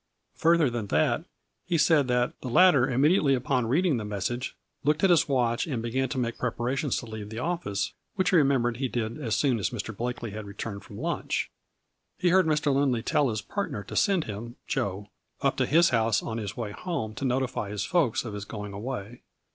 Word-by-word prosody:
Further 165 Hz, -2 st, +4 dB
than 120 Hz, -4 st, -3 dB
that, 75 Hz, -4 st, +1 dB, 0.4 s
he 170 Hz, -, +2 dB
said 155 Hz, -4 st, +4 dB
that 125 Hz, 0 st, +1 dB
the -, -, -5 dB
latter 135 Hz, -1 st, +5 dB
immediately 140 Hz, +2 st, +4 dB
upon 125 Hz, -1 st, 0 dB
reading 155 Hz, +3 st, +2 dB
the 110 Hz, -, -3 dB
message 105 Hz, +5 st, -3 dB, 0.3 s
looked 150 Hz, +4 st, +1 dB
at 190 Hz, -, +6 dB
his 170 Hz, -3 st, +4 dB
watch 120 Hz, 0 st, +1 dB
and 130 Hz, -7 st, -2 dB
began 130 Hz, +2 st, -1 dB
to 135 Hz, -, -4 dB
make 120 Hz, -2 st, -2 dB
preparations 125 Hz, +3 st, -1 dB
to -, -, -4 dB
leave 110 Hz, -2 st, -7 dB
the 110 Hz, -, -7 dB
office, 120 Hz, -, -2 dB, 0.2 s
which 190 Hz, -2 st, +1 dB
he 185 Hz, -, +5 dB
re -, -, +7 dB
membered 125 Hz, -4 st, +1 dB
he 130 Hz, +1 st, -1 dB
did 120 Hz, +2 st, -3 dB
as 115 Hz, -5 st, 0 dB
soon 130 Hz, -6 st, +2 dB
as 100 Hz, -, 0 dB
Mr. 110 Hz, -2 st, -5 dB
Blakely 120 Hz, 0 st, -4 dB
had 105 Hz, 0 st, -7 dB
returned 100 Hz, 0 st, -6 dB
from -, -, -11 dB
lunch. -, -, -2 dB, 0.7 s
He 180 Hz, -, +2 dB
heard 185 Hz, 0 st, +4 dB
Mr. 150 Hz, -2 st, +2 dB
Lindley 135 Hz, -4 st, +1 dB
tell 140 Hz, -3 st, +2 dB
his 110 Hz, -2 st, -3 dB
partner 200 Hz, -, -3 dB
to 95 Hz, -, -9 dB
send 195 Hz, -5 st, +3 dB
him, 115 Hz, +2 st, -7 dB
Joe, 105 Hz, -7 st, -2 dB, 0.3 s
up -, -, +2 dB
to -, -, +1 dB
his 165 Hz, +3 st, +5 dB
house 115 Hz, -4 st, +2 dB
on 115 Hz, 0 st, -3 dB
his 105 Hz, -2 st, -5 dB
way 115 Hz, -4 st, -3 dB
home 110 Hz, -, -4 dB
to 110 Hz, -, -7 dB
notify 130 Hz, -5 st, -1 dB
his 105 Hz, 0 st, -3 dB
folks 145 Hz, -10 st, +1 dB
of 110 Hz, -, -5 dB
his 105 Hz, -1 st, -5 dB
going 105 Hz, -1 st, -6 dB
away. 115 Hz, +1 st, -6 dB
125 Hz, 210 wpm, -27 LUFS, 110-145 Hz, 0.7 s, re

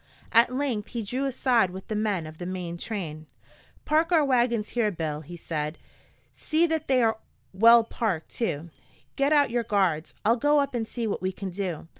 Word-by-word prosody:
At 230 Hz, +2 st, +5 dB
length 255 Hz, -6 st, -2 dB
he 235 Hz, -2 st, -4 dB
drew 255 Hz, +7 st, -2 dB
aside 250 Hz, -6 st, +2 dB
with 190 Hz, +1 st, -9 dB
the 215 Hz, -, -3 dB
men 205 Hz, -6 st, -1 dB
of 155 Hz, 0 st, -11 dB
the 175 Hz, -, -5 dB
main 180 Hz, -2 st, -4 dB
train. 165 Hz, -6 st, -5 dB, 0.6 s
"Park 320 Hz, +3 st, +2 dB
our 320 Hz, -4 st, +4 dB
wagons 240 Hz, -5 st, +1 dB
here, 235 Hz, -3 st, +1 dB
Bill," 155 Hz, -5 st, -4 dB
he 175 Hz, +3 st, -10 dB
said. 155 Hz, -1 st, -4 dB, 0.5 s
"See 315 Hz, +2 st, +1 dB
that 320 Hz, -2 st, -2 dB
they 255 Hz, -2 st, +3 dB
are 225 Hz, -1 st, +1 dB, 0.3 s
well 230 Hz, +4 st, +7 dB
parked, 210 Hz, -8 st, -3 dB
too. 170 Hz, -8 st, -3 dB, 0.4 s
Get 275 Hz, +2 st, +1 dB
out 285 Hz, -5 st, +4 dB
your 240 Hz, 0 st, +1 dB
guards. 190 Hz, -8 st, 0 dB
I'll 230 Hz, +3 st, +4 dB
go 290 Hz, +4 st, +3 dB
up 280 Hz, -1 st, -1 dB
and 230 Hz, -2 st, -2 dB
see 235 Hz, 0 st, -4 dB
what 210 Hz, -, -2 dB
we 185 Hz, 0 st, -1 dB
can 190 Hz, 0 st, -6 dB
do. 180 Hz, -4 st, -4 dB
220 Hz, 195 wpm, -26 LUFS, 180-255 Hz, 0.6 s, well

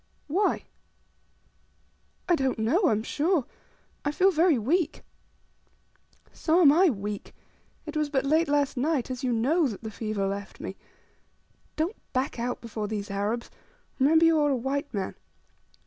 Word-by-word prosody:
"Why?" 370 Hz, +8 st, +1 dB, 1.6 s
"I 355 Hz, -, +4 dB
don't 265 Hz, -5 st, 0 dB
know, 250 Hz, -, +2 dB
I -, -, +4 dB
am 215 Hz, 0 st, 0 dB
sure. 305 Hz, +2 st, +1 dB, 0.6 s
I 290 Hz, -, 0 dB
feel 375 Hz, +6 st, +4 dB
very 330 Hz, -3 st, +3 dB
weak." 310 Hz, -, 0 dB, 1.3 s
"So 325 Hz, +2 st, +2 dB
am 290 Hz, -5 st, +8 dB
I 355 Hz, +4 st, +5 dB
weak. 205 Hz, -4 st, -5 dB, 0.5 s
It 305 Hz, -, -7 dB
was 305 Hz, -1 st, 0 dB
but 275 Hz, -2 st, 0 dB
late 315 Hz, +4 st, +3 dB
last 285 Hz, -1 st, +1 dB
night, 270 Hz, -1 st, 0 dB
as 255 Hz, +1 st, -5 dB
you 255 Hz, -, +1 dB
know, 280 Hz, +8 st, +2 dB
that 225 Hz, -2 st, -7 dB
the 220 Hz, -, -5 dB
fever 215 Hz, -2 st, -2 dB
left 200 Hz, 0 st, -5 dB
me. -, -, -6 dB, 1.0 s
Don't 335 Hz, +8 st, -1 dB, 0.2 s
back 255 Hz, -1 st, -1 dB
out 245 Hz, +1 st, -2 dB
before 220 Hz, -2 st, -4 dB
these 205 Hz, -1 st, -4 dB
Arabs; 210 Hz, +4 st, -2 dB, 0.5 s
remember 320 Hz, +5 st, +5 dB
you 325 Hz, -1 st, +4 dB
are 295 Hz, -1 st, +3 dB
a 275 Hz, -, +2 dB
white 275 Hz, +3 st, -2 dB
man. 195 Hz, -5 st, -3 dB
275 Hz, 155 wpm, -27 LUFS, 225-315 Hz, 1.6 s, am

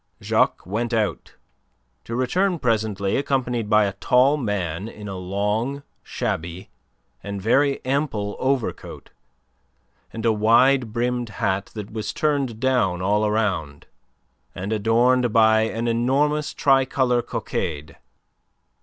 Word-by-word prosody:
Jacques -, -, +1 dB
went 115 Hz, +5 st, -2 dB
out, 105 Hz, -9 st, -2 dB, 0.7 s
to 115 Hz, -, -5 dB
return 175 Hz, +9 st, +1 dB
presently 110 Hz, -6 st, 0 dB
accompanied 125 Hz, -5 st, -1 dB
by 105 Hz, -1 st, +5 dB
a 100 Hz, -, -2 dB
tall 125 Hz, +8 st, +3 dB
man 100 Hz, -, -3 dB
in 105 Hz, -2 st, -9 dB
a 95 Hz, -, -5 dB
long, 105 Hz, +9 st, -2 dB, 0.2 s
shabby, 85 Hz, +3 st, -4 dB, 0.5 s
and 100 Hz, 0 st, -5 dB
very 135 Hz, +8 st, +1 dB
ample 130 Hz, -7 st, -1 dB
overcoat 130 Hz, -2 st, -3 dB, 1.0 s
and 115 Hz, 0 st, -6 dB
a 115 Hz, -, +4 dB
wide 115 Hz, +3 st, +3 dB
brimmed 120 Hz, +1 st, -1 dB
hat 100 Hz, -1 st, -2 dB
that 105 Hz, -2 st, -7 dB
was 110 Hz, -1 st, -4 dB
turned 140 Hz, -7 st, -1 dB
down 120 Hz, -9 st, +1 dB
all 105 Hz, +2 st, +2 dB
round, 90 Hz, -10 st, -2 dB, 0.7 s
and 95 Hz, +4 st, -3 dB
adorned 120 Hz, +3 st, +2 dB
by 110 Hz, 0 st, +5 dB
an 115 Hz, +1 st, -3 dB
enormous 140 Hz, +6 st, +1 dB
tricolour 130 Hz, -2 st, +2 dB
cockade. 75 Hz, -9 st, -4 dB
115 Hz, 120 wpm, -23 LUFS, 100-130 Hz, 1.0 s, by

